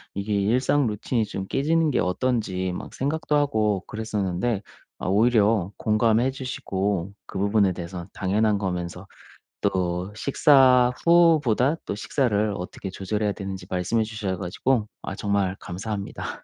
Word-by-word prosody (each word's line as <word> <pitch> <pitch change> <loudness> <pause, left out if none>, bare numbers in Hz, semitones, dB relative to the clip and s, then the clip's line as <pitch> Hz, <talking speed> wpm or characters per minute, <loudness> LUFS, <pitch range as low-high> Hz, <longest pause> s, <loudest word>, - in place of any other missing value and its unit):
이게 100 +2 -2
일상 120 +7 +2
루틴이 110 +2 -1
좀 95 -2 -5
깨지는 155 +7 +1
게 - - +1
어떤지 95 -1 0
막 - - -7
생각도 150 +2 -1
하고 110 -9 +1
그랬었는데 105 -1 -2 0.4
아 - - -4
오히려 105 -1 +3
공감해 110 +3 +2
주시고 100 -8 -2 0.2
그 - - -7
부분에 100 -1 +3
대해서 85 0 -6
당연한 105 +2 +1
거면서 90 -1 -4 0.6
또 90 +1 -1
식사 130 0 +5
후보다 160 -6 +4
또 - - -3
식사를 105 -3 0
어떻게 95 +1 -6
조절해야 105 +2 -1
되는지 95 -2 -6
말씀해 95 +5 0
주셔 105 -4 -3
가지고 105 +6 0
아 95 - -5
정말 100 -2 0
감사합니다. 100 +3 -5
105 Hz, 310 characters per minute, -24 LUFS, 95-125 Hz, 0.6 s, 식사